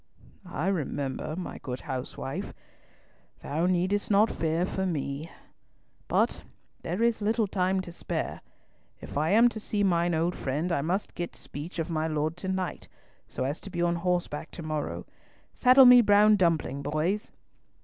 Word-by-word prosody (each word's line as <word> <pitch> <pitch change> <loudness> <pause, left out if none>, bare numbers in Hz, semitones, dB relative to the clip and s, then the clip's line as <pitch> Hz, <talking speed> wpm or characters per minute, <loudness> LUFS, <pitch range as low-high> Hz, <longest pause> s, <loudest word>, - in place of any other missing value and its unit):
"I 165 -2 -3
remember, 150 -5 -2
my 180 - -6
good 125 -3 -6
housewife. 130 +2 -5 0.9
Thou 160 +5 0
needst 185 +3 +1
not 210 +2 +4
fear 165 +2 0
for 190 0 -2
me. 150 -1 -3 0.8
But - - +1 0.4
there 180 +7 -2
is 235 -2 +2
little 220 +2 +2
time 190 -1 0
to 180 - -8
spare. - - -4 0.6
If - - -9
I 155 +3 +1
am 225 +5 +6
to 225 - -7
see 210 -1 -1
mine 175 -2 +2
old 170 +2 0
friend, 150 +7 -2
I 170 - +1
must 180 +7 -2
get 175 -1 -5
speech 150 +6 -8
of 165 0 -2
my 160 0 0
Lord 155 0 -1
to 190 - -6
night, 190 -1 -3 0.4
so - - -4
as 140 +4 -2
to - - -8
be 175 -2 -2
on 170 0 +1
horseback 175 -3 -2
to 170 - -7
morrow. 155 -1 -3 0.5
Saddle 255 +1 +7
me 250 0 +9
Brown 210 0 +6
Dumpling, 165 -7 +1
boys." 155 +8 -1
175 Hz, 160 wpm, -28 LUFS, 155-195 Hz, 0.9 s, me